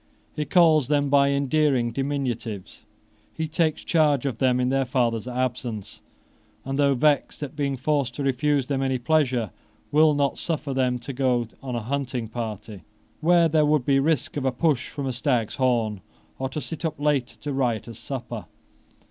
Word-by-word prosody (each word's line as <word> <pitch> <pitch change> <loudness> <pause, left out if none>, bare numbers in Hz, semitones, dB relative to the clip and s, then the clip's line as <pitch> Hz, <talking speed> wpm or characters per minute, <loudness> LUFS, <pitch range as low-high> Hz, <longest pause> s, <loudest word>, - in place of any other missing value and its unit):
He 150 - -2
calls 155 -3 +4
them 145 -1 +1
by 140 -1 +5
endearing 140 -3 +2
diminutives: 125 -7 -4 0.5
he 160 0 -2
takes 155 0 0
charge 150 -5 +2
of 130 -5 -2
them 125 -1 +3
in 125 0 +1
their 135 0 +2
father's 120 -3 0
absence, 125 -4 -3 0.6
and, 135 +1 -3
though 140 -1 +4
vexed 145 +2 +1
at 145 0 -6
being 140 -2 -1
forced 140 -2 0
to 145 - -3
refuse 140 +1 +1
them 135 0 -1
any 130 -1 0
pleasure, 125 - +1 0.4
will 155 0 +5
not 140 -1 0
suffer 150 -4 -2
them 130 -1 +1
to 125 +3 -7
go 125 -3 +1
on 130 -3 -4
a 120 - -2
hunting 130 -2 -2
party, 110 -3 -6 0.4
where 170 +1 +4
there 155 -1 +3
would 150 -3 +2
be 135 -1 +3
risk 150 0 0
of 145 - -2
a 130 - +2
push 140 0 0
from 140 - -5
a 130 - -2
stag's 120 -3 0
horn, 115 -6 +1 0.4
or 130 0 -2
to 145 - -4
sit 145 +5 -7
up 160 -2 -2
late 140 -6 0
at - - -20
a 145 - -2
riotous 120 -3 -2
supper. 120 -3 -6
135 Hz, 180 wpm, -25 LUFS, 120-145 Hz, 0.6 s, by